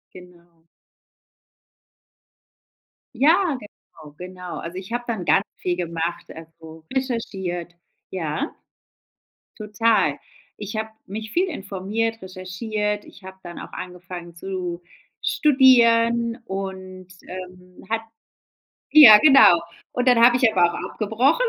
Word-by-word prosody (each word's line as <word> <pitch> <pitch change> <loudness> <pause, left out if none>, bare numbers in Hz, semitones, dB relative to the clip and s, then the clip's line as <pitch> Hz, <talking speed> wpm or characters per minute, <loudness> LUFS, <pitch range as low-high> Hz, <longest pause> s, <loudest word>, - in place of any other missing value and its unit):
Genau. 175 -2 -17 2.5
Ja, 315 +5 +3
genau, 155 -8 -16
genau. 180 0 -8
Also, 170 +2 -8
ich 190 +4 -8
hab 240 0 -3
dann 220 -7 -3
ganz 195 - +3
viel 180 -1 -2
gemacht, 170 -1 -4
also 160 0 -13
recherchiert 190 -9 -4 0.4
Ja? 185 - -4 1.0
Total. 215 +1 +1 0.4
Ich 210 +1 -7
hab 220 0 -3 0.2
mich 215 +2 -7
viel 365 +7 +1
informiert, 215 - -4
recherchiert. 205 +3 -4
Ich 195 - -17
hab 190 0 -12
dann 175 0 -9
auch - - -10
angefangen 180 -1 -9
zu 180 -1 -5 0.4
studieren 235 -4 +4
und, 190 -2 -7 0.2
äh, 180 0 -11
hat 225 0 -1 0.9
Ja, 245 -9 +10
genau. 270 - +7 0.3
Und 250 +1 -2
dann 250 -1 +5
hab 240 +1 +7
ich 245 -2 +3
aber 175 -4 +2
auch - - -5
abgebrochen, 245 - +1
195 Hz, 110 wpm, -22 LUFS, 180-230 Hz, 2.5 s, Ja